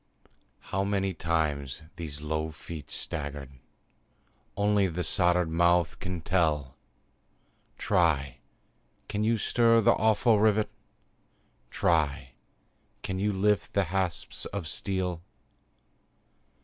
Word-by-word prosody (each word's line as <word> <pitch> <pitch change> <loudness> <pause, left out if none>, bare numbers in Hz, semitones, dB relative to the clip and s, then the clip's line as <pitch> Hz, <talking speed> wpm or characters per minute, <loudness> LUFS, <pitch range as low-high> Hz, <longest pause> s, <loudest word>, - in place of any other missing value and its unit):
How 95 - +1
many 100 -1 0
times 80 -4 -1
these 75 -4 -6
low 80 +1 -2
feet 75 0 -9
staggered, 70 -4 -6 1.0
Only 100 -1 +3
the 90 0 -3
soldered 90 0 +2
mouth 85 -1 +2
can 90 -2 -4
tell; 80 -6 0 1.0
Try! 75 -7 +1 0.7
can 105 0 -2
you 115 +1 +2
stir 115 +2 +3
the 115 +1 +5
awful 110 0 +3
rivet? 110 0 +2 1.0
Try! 75 -6 0 0.7
can 95 -1 -3
you 105 +2 +1
lift 100 -1 +1
the 100 - +3
hasps 95 -4 -2
of 100 -6 -5
steel? 90 -1 -1
90 Hz, 100 wpm, -28 LUFS, 80-100 Hz, 1.0 s, the